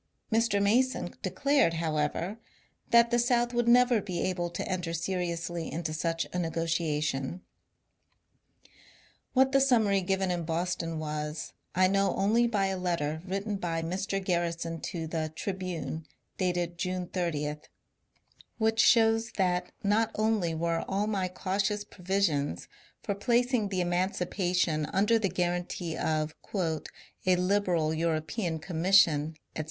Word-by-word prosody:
Mr. 225 -2 +2
Mason 245 +6 +2
declared, 275 -12 +2
however, 160 +5 -1 0.5
that 235 0 +5
the 240 - +3
South 240 0 +2
would 240 -1 +1
never 245 -2 +5
be 185 -3 -4
able 175 -2 -1
to - - -4
enter 180 -3 -2
seriously 170 -1 -2
into 160 -1 -3
such 165 +1 -1
a 180 - -1
ne 170 -2 -1
gotiation. 160 -2 -1 1.9
What 265 0 +4
the 275 0 +4
summary 220 -7 +3
given 190 0 0
in 175 -1 -1
Boston 165 0 -2
was, 150 0 -4 0.2
I 185 +1 +5
know 195 0 +2
only 220 +5 +3
by 205 -4 +1
a 190 -1 -1
letter 160 -4 -1
written 200 +2 -2
by 165 -3 -2
Mr. 190 +3 -2
Garrison 170 -2 -1
to 170 -4 -4
the 155 -1 -3
" - - -35
Tribune," 165 -6 -4 0.3
dated 175 -2 -1
June 185 0 -2
30, 150 -5 -2 1.0
which 225 0 +1
shows 225 -1 +4
that 180 -2 +1
not 210 +2 +2
only 215 -6 +1
were 165 0 0
all 195 +2 0
my 200 -3 0
cautious 195 +3 -1
provisions 180 - -1 0.4
for 200 - -1
placing 235 +1 +1
the 185 -2 0
emancipation 180 -2 0
under 210 +6 +2
the 200 -3 0
guarantee 175 -1 -2
of 155 -1 -1
*^ 165 -6 -2 0.4
a 185 - +6
liberal 180 -4 +1
European 160 +2 -1
commission, 160 -2 +3 0.2
etc. - - -4
180 Hz, 135 wpm, -29 LUFS, 165-205 Hz, 1.9 s, a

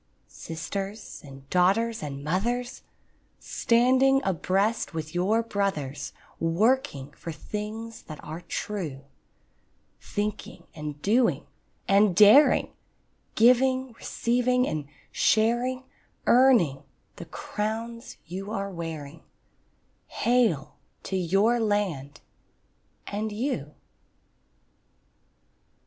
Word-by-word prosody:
Sisters 195 +6 -6
and 135 -1 -13
daughters 205 +6 +2
and 140 -2 -6
mothers, 240 - -1 0.6
Standing 260 +3 +3
abreast 195 +3 0
with 155 -1 -5
your 200 +6 +2
brothers, 195 -11 -2 0.3
Working 165 - +1
for 165 - -8
things 215 +7 -6
that 155 -2 -8
are 160 +3 -7
true; 160 -10 -5 1.0
Thinking 210 0 -4
and 150 -2 -6
doing 230 +4 +2 0.4
and 200 -1 +4
daring, 215 - +6 0.6
Giving, 255 +2 +4
receiving, 250 +2 0
and 150 -2 -3 0.2
sharing, 240 +4 +2 0.4
Earning 235 - +5 0.4
the - - -8
crowns 230 +3 -5
you 190 +4 -6
are 200 -2 -3
wearing— 165 -3 -7 0.9
Hail 220 - +1 0.3
to 195 - -4
your 195 +7 +2
land 185 -10 -1 0.8
and 215 +2 -3
you! 205 - -3
205 Hz, 85 wpm, -26 LUFS, 165-230 Hz, 1.0 s, daring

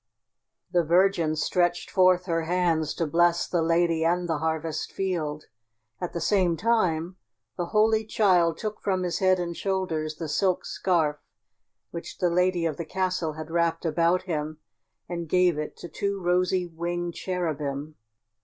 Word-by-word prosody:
The 175 -1 +3
Virgin 170 -1 +3
stretched 175 +2 0
forth 185 -1 +4
her 165 -3 -1
hands 170 -3 +1
to 165 - 0
bless 170 +2 +2
the 175 - 0
lady 165 0 +2
and 175 +2 +1
the 160 -3 -1
harvest 160 0 -2
field. 160 -6 -2 0.6
At 180 - -4
the 170 - -2
same 175 -1 +2
time 185 -6 +1 0.4
the 175 - -3
Holy 220 +1 +3
Child 185 -6 +2
took 215 -1 -5
from 185 -2 0
his 175 -1 -1
head 185 -1 +3
and 170 -1 -3
shoulders 165 -6 -2
the 160 +1 -5
silk 185 +4 0
scarf 160 -5 0 0.7
which 170 - -7
the 175 -1 +1
lady 180 -1 +2
of 155 -3 -1
the 170 - -3
castle 180 -2 -1
had 155 +1 -8
wrapped 170 0 0
about 170 +3 +2
him, 155 -3 -3 0.5
and 170 -2 -5
gave 180 -3 +3
it 150 - -5
to - - -8
two 200 +2 -3
rosy 180 0 +1
winged 175 +1 -4
cherubim. 155 -6 -3
175 Hz, 155 wpm, -26 LUFS, 160-185 Hz, 0.7 s, forth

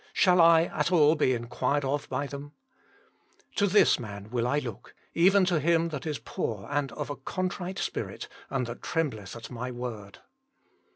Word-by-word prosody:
Shall 180 -2 +5
I 165 -1 +7
at 160 0 -1
all 155 -3 +6
be 150 -5 +2
inquired 125 +4 -1
of 140 +2 -2
by 145 - -1
them? 145 +1 -8 0.3
" - - -33
" - - -33
To 200 - +4
this 205 -5 +5
man 100 -2 -8
will 120 -1 0
I 140 +3 +1
look, 120 -5 -6 0.2
even 190 +3 +5
to 175 -4 +2
him 165 +1 +2
that 150 -2 -5
is 150 -2 -2
poor 110 -3 -4
and 145 -2 0
of 150 -1 -4
a - - -3
contrite 185 +5 -4
spirit, - - -4 0.2
and 135 -2 -1
that 120 +1 -7
trembleth 110 - -2
at 115 +1 -9
My 125 +1 -4
word." 120 -5 -6
145 Hz, 185 wpm, -28 LUFS, 120-165 Hz, 0.3 s, I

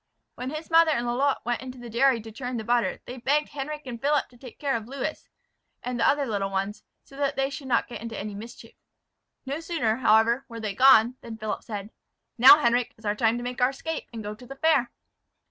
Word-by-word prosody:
When 250 +1 -5
his 310 +3 -7
mother 330 0 +6
and 240 -6 0
Lalotte 260 +3 0
went 240 0 -1
into 260 0 -8
the 245 -1 -9
dairy 240 +2 +3
to 225 +1 -10
churn 245 +2 -5
the 220 - -4
butter 240 +1 0
they 250 - -8
begged 290 +5 +1
Henric 300 +1 -5
and 235 -3 -7
Philip 295 +1 +1
to 245 - -19
take 250 -3 -12
care 280 -3 -1
of 225 -1 -4
Lewis 275 +4 -5 0.5
and 250 -1 -3
the - - +3
other 285 0 +1
little 200 -5 -2
ones, 195 +2 -3 0.2
so 275 - -17
that 280 0 0
they 270 0 0
should 275 -1 -7
not 235 -3 +1
get 240 - -8
into 230 -2 -6
any 210 0 -5
mischief. 225 +4 -10 0.7
No 275 +3 -3
sooner, 320 -10 -1
however, 230 +1 +3
were 230 -1 -7
they 215 -2 -3
gone, 250 +1 +6
than 225 -1 -8
Philip 215 -1 -4
said, 210 -1 -7 0.4
"Now, 255 +5 +9
Henric, 240 0 +2
is 220 - -16
our 205 - +1
time 225 +2 +1
to 240 - -5
make 250 +1 -5
our 250 - +5
escape, 320 +4 -5
and 225 -2 -7
go 210 +1 -5
to 245 +4 -14
the 275 - -8
fair." 275 -4 +2
245 Hz, 230 wpm, -26 LUFS, 225-275 Hz, 0.7 s, Now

